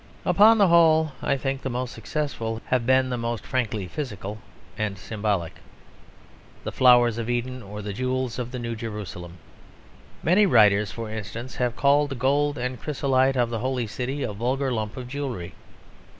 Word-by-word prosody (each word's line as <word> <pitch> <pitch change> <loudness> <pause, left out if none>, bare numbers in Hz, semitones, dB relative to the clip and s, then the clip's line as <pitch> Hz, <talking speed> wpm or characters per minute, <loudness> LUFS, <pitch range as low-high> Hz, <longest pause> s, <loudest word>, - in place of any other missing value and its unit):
Upon 220 +2 +6
the 200 -4 +5
whole, 160 -2 +5
I 140 - +1
think, 135 0 -3
the 135 - -3
most 125 0 -3
successful 115 -2 -3
have 125 -2 +1
been 130 0 +3
the 125 - -2
most 115 -1 -3
frankly 110 -6 -1
physical 105 - -5 0.4
and 105 -2 -2
symbolic; 100 -4 -2 1.1
the - - -4
flowers 120 -2 +5
of 115 0 -3
Eden 125 +1 -2
or 105 0 -8
the 105 0 -4
jewels 130 +2 -2
of 120 -1 -3
the 125 - -6
New 115 -1 -4
Jerusalem. 105 -6 -7 0.9
Many 200 +5 +4
writers, 105 - +4
for 115 -2 -6
instance, 110 +4 -6
have 125 -1 0
called 145 +1 +3
the 135 - -4
gold 145 +3 +1
and 125 -1 -4
chrysolite 135 -2 +1
of 120 -1 +1
the 115 - -2
Holy 130 -1 -1
City 125 +6 -4
a 105 - -3
vulgar 130 +5 -1
lump 110 -2 -3
of 125 -1 -6
jewellery. 125 -10 -5
125 Hz, 170 wpm, -25 LUFS, 110-135 Hz, 1.1 s, Upon